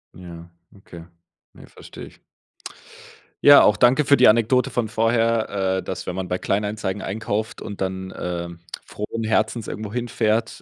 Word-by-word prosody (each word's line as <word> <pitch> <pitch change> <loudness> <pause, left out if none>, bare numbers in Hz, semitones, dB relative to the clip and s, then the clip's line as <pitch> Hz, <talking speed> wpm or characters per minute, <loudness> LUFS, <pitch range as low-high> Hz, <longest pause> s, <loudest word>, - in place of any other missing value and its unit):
Ja, 85 -1 -11 0.3
okay. 85 -4 -13 0.5
Ne, - - -15
verstehe - - -12
ich. - - -19 1.2
Ja, 145 0 +8
auch 105 - +4
danke 125 +5 +4
für 140 0 +5
die - - +6
Anekdote 115 +3 +3
von 120 -3 -1
vorher, 115 -4 0
äh, 95 - -4
dass, 95 - -6
wenn 90 - -4
man 95 -1 -4
bei 90 0 -2
Kleinanzeigen 105 -1 -2
einkauft 110 +2 -4
und 100 - -8
dann, 95 0 -4
ähm, 85 -1 -5 0.3
frohen 110 +2 -6
Herzens 110 +1 -1
irgendwo 105 -1 -6
hinfährt 115 -2 -1
105 Hz, 155 wpm, -22 LUFS, 95-115 Hz, 1.2 s, Ja